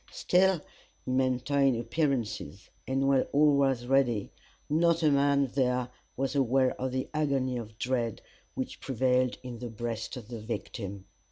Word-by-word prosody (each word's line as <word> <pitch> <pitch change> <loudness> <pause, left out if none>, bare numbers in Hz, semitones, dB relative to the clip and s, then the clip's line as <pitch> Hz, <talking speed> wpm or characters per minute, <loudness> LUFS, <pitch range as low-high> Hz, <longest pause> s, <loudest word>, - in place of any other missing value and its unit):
Still 185 0 +3 0.5
he - - -3
maintained 130 0 +2
appearances, 115 - -2 0.2
and 135 +1 +1
when 135 -1 +4
all 145 0 +5
was 135 -3 +2
ready, 125 -5 +2 0.4
not 165 +2 +2
a 155 - +5
man 140 0 +3
there 125 -2 +1 0.3
was 135 +1 -1
aware 130 -1 +3
of 130 0 -1
the 130 0 -2
agony 140 -4 0
of 110 -2 -8
dread 120 -3 -1 0.4
which - - -4
prevailed 125 0 +1
in 125 -2 -7
the 120 - -5
breast 115 +2 -4
of 115 -4 -9
the 120 -1 -6
victim. 100 -3 -5
130 Hz, 150 wpm, -29 LUFS, 120-140 Hz, 0.5 s, all